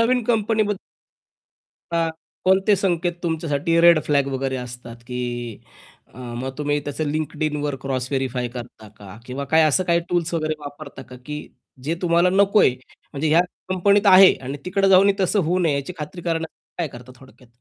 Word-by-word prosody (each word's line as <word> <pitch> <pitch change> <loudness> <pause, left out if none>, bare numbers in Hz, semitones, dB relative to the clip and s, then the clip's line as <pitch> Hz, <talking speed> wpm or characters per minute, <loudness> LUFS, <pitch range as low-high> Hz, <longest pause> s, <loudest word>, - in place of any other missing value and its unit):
नवीन 245 +2 +2
company 220 -1 +1
बद्द 205 -2 -2 1.2
हां, 165 -1 +1 0.4
कोणते 190 +2 +4
संकेत 175 -2 0
तुमच्यासाठी 165 -1 0
रेड 170 -2 +7
फ्लॅग 140 -2 +1
वगैरे 135 0 -2
असतात, 125 -1 -8
की 120 -2 -5 0.5
अ, - - -16
मग 125 +1 -5
तुम्ही 145 0 0
त्या 145 +2 -3
Linkedinवर 150 -1 -2
क्रॉस 130 -2 -2
व्हेरिफाय 130 -2 -1
करता 120 -3 -10
का? 100 -1 -12
किंवा 130 +3 -5
काय 160 0 +6
असं 185 +5 +2
काही 170 -1 +2
टूल्स 170 -1 -1
वगैरे 155 -1 0
वापरता 145 -2 -9
का? 125 -1 -12
की 150 0 -5 0.5
जे 160 +4 -1
तुम्हाला 170 0 +3
नकोय, 200 0 +4 0.4
म्हणजे 145 +2 -1
ह्या 165 +3 +5 0.3
कंपनीत 200 +3 +3
आहे 190 0 +8
आणि 135 +2 -5
तिकडे 195 +1 +1
जाऊनही 195 +1 +6
तसं 195 +2 +2
होऊ 180 +3 +1
नये 165 -4 +2
याची 140 +6 -4
खात्री 155 +3 -7
करायला 165 -1 -2 0.3
काय 170 -3 -1
करता 125 -1 -12
थोडक्यात? 130 -1 -18
155 Hz, 165 wpm, -22 LUFS, 135-180 Hz, 1.2 s, आहे